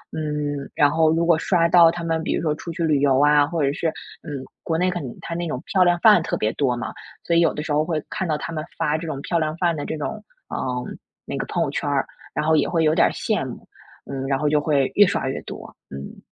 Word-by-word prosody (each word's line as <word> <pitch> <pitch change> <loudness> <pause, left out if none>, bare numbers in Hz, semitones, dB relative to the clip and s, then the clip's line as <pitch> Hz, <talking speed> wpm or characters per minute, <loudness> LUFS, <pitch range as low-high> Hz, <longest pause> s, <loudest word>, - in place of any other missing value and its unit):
嗯， 150 -2 -3
然 145 -1 +4
后 160 0 +3
如 165 +1 +1
果 170 -2 +4
刷 170 -2 +2
到 170 -1 +7
他 170 0 -4
们 165 -1 -1
比 - - -1
如 - - -1
说 155 -2 0
出 165 - -8
去 170 - -3
旅 155 -3 +2
游 135 -2 +3
啊， 145 0 +5
或 165 -2 -1
者 140 - +2
是， 165 - -2 0.4
嗯， 140 -3 -6 0.2
国 160 - -1
内 180 +2 +1
可 175 - -3
能 130 - -5
它 170 - -5
那 175 0 -2
种 130 -3 -4
漂 190 -2 +3
亮 175 0 +3
饭 210 -5 +7
特 - - -2
别 110 - 0
多 130 -4 0
嘛， 120 - -5 0.3
所 170 - -1
以 - - +5
有 170 - +4
的 150 - -4
时 160 - -5
候 150 - +3
会 160 -3 -2
看 190 - -3
到 155 -2 0
他 - - -6
们 155 - -3
发 150 - +1
这 165 - -6
种 145 -4 -4
漂 170 - 0
亮 155 0 -1
饭 170 -1 +1
的 145 - -4
这 160 - -4
种， 215 +8 -5 0.2
啊， - - -5 0.7
那 - - -5
个 - - -2
朋 - - 0
友 - - -2
圈 - - -2
儿， - - +1 0.3
然 - - -1
后 160 0 +4
也 150 - +2
会 165 -2 +1
有 155 0 +3
点 - - +4
儿 - - -2
羡 - - -1
慕。 - - -10 0.4
嗯， 135 -1 -4
然 135 -1 +1
后 150 +1 0
就 150 0 +3
会 145 -3 +1
越 205 -1 +7
刷 180 - -1
越 - - -4
多， - - -9 0.2
嗯。 70 +1 -9
155 Hz, 295 characters per minute, -22 LUFS, 145-170 Hz, 0.7 s, 到